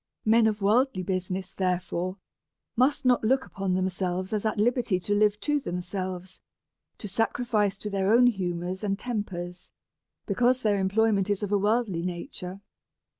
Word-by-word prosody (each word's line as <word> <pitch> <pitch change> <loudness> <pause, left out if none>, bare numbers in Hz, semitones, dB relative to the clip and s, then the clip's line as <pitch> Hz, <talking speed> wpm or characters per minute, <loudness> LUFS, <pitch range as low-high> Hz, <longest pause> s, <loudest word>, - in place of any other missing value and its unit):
Men 225 +1 +5
of 210 -2 -1
worldly 220 -1 +2
business, 185 0 -3
therefore, 185 0 -2 0.6
must 265 +3 +2
not 250 -2 +4
look 260 +4 +2
upon 195 -2 -2
themselves 185 +1 -1
as 215 +1 0
at 215 - -2
liberty 235 -3 +1
to 195 +3 -1
live 210 0 +3
to 295 -1 +1
themselves, 185 -2 -5 0.6
to 210 - -6
sacrifice 215 -1 0
to 210 - -5
their 195 0 +1
own 240 +2 +6
humours 185 -4 -1
and 195 -1 0
tempers, 185 -7 -5 0.6
because 245 +5 +2
their 205 -2 +2
employment 200 0 +2
is 205 0 0
of 205 - -3
a 205 - +4
worldly 210 -4 +1
nature. 180 - -5
200 Hz, 150 wpm, -27 LUFS, 185-225 Hz, 0.6 s, own